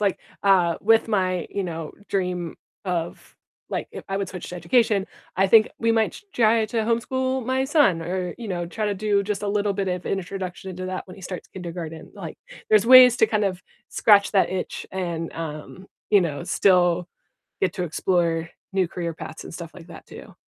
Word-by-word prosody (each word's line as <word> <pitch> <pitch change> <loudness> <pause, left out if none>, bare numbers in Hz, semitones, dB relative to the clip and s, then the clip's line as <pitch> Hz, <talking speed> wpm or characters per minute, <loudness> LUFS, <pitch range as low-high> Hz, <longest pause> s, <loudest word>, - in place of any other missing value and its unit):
Like, 200 -2 +1 0.2
uh, 180 -4 +4
with 225 +2 +4
my, 185 -5 0
you 200 -2 -3
know, 165 -2 -5 0.2
dream 180 -3 -1 0.3
of, 175 -2 -4 0.4
like, - - -3
if - - -9
I 195 - 0
would 195 -2 -2
switch 180 -2 -7
to 180 - -6
education, 200 +3 +2 0.3
I 195 +1 +3
think 215 +2 +6
we 230 0 +1
might 220 -1 +2
t 410 - -13
try 225 -1 +3
to 230 - -6
homeschool 260 +2 -1
my 260 +1 +1
son 270 - +3
or, 180 +1 -3
you 230 -3 -7
know, 175 -2 -2
try 215 +5 -4
to 205 - 0
do 200 0 +1
just 205 0 -3
a 205 - -1
little 205 0 +1
bit 195 -1 -2
of 180 -1 -3
introduction 190 -1 -4
into 185 0 -6
that 185 +1 -4
when 185 - -11
he 195 - -13
starts 180 0 -7
kindergarten. 170 -3 -7
Like, - - -8 0.3
there's 215 -1 +5
ways 250 -1 +9
to 220 - +5
kind 215 -1 0
of 180 -3 -4 0.3
scratch 205 -1 +4
that 195 - +3
itch 185 0 -4
and, 170 -3 -3
um, 165 +3 -7 0.2
you 205 -2 +6
know, 160 -2 -2
still 180 -2 +3 0.5
get 185 - +1
to 180 - -3
explore 165 -1 0 0.2
new 190 -2 +1
career 170 -1 -4
paths 160 - -8
and - - -10
stuff 165 -1 -7
like 175 -1 -13
that - - -12
too. - - -12
190 Hz, 200 wpm, -24 LUFS, 175-210 Hz, 0.5 s, ways